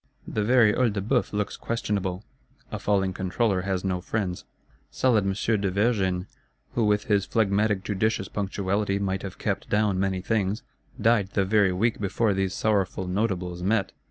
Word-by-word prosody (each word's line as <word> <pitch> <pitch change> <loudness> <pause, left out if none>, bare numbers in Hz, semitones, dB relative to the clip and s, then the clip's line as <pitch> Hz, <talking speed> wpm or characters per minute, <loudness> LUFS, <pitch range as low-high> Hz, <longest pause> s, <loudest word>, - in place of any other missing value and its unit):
The 105 - -1
very 115 -2 +5
Œil 120 -4 +2
de 100 - -2
Bœuf 115 +6 0
looks 105 -1 -2
questionable; 100 -4 -2 0.5
a - - -4
falling 95 -2 +1
Controller 95 +2 0
has 95 -1 -2
no 90 -1 -1
friends. 95 -2 -3 0.4
Solid 115 -6 +2
M. 100 +2 0
de 100 - +1
Vergennes, 95 -3 +1 0.5
who 115 - +1
with 105 0 +2
his 100 -2 +1
phlegmatic 105 -2 +1
judicious 100 0 0
punctuality 100 0 -1
might 95 -1 -1
have 95 - -7
kept - - -3
down 105 -2 +2
many 95 -1 0
things, 100 0 -1 0.4
died 110 -4 +3
the 100 - +2
very 100 -1 +3
week 110 +5 0
before 105 +2 +1
these 95 0 -1
sorrowful 100 -3 0
Notables 90 -3 -1
met. 100 0 +1
100 Hz, 160 wpm, -26 LUFS, 95-110 Hz, 0.5 s, very